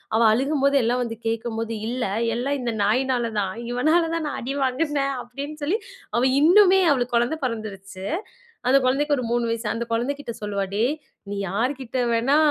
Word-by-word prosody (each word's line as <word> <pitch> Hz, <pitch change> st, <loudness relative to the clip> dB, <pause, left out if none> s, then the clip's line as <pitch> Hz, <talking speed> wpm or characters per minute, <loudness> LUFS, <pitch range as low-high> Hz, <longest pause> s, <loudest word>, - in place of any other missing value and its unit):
அவ 225 Hz, -, +3 dB
அழுகும்போது, 280 Hz, +2 st, +2 dB
எல்லாம் 245 Hz, +2 st, +1 dB
வந்து 225 Hz, -1 st, -6 dB
கேக்கும்போது. 225 Hz, 0 st, -2 dB, 0.2 s
"இல்ல 250 Hz, +1 st, -2 dB, 0.3 s
எல்லாம் 275 Hz, +3 st, -1 dB
இந்த 240 Hz, -1 st, -1 dB
நாய்னாலதான். 230 Hz, -4 st, 0 dB, 0.2 s
இவனாலதான் 325 Hz, +5 st, +2 dB
நான் 290 Hz, -, -4 dB
அடி 260 Hz, +3 st, -3 dB
வாங்குனேன்." 275 Hz, +1 st, 0 dB
அப்படின்னு 275 Hz, +5 st, -7 dB
சொல்லி, 340 Hz, +9 st, +1 dB, 0.4 s
அவ 235 Hz, -, +3 dB, 0.2 s
இன்னுமே 375 Hz, +4 st, +7 dB
அவளுக்கு 250 Hz, -3 st, 0 dB
கொழந்த 240 Hz, +6 st, +2 dB
பொறந்திருச்சு. 195 Hz, -5 st, -5 dB, 0.6 s
அந்த 265 Hz, +2 st, +6 dB
குழந்தைக்கு 285 Hz, +3 st, +2 dB
ஒரு 250 Hz, -, -2 dB
3 240 Hz, 0 st, +1 dB
வயசு. 230 Hz, 0 st, -2 dB
அந்த 235 Hz, +1 st, -3 dB
கொழந்தை 240 Hz, +5 st, 0 dB
கிட்ட 235 Hz, -5 st, -6 dB
சொல்லுவா, 205 Hz, -1 st, -2 dB
"டேய்! 235 Hz, +8 st, +2 dB, 0.4 s
நீ 205 Hz, -, -3 dB
யார்கிட்ட 255 Hz, +4 st, -2 dB
வேணா 245 Hz, +6 st, +3 dB
250 Hz, 160 wpm, -24 LUFS, 230-285 Hz, 0.6 s, இன்னுமே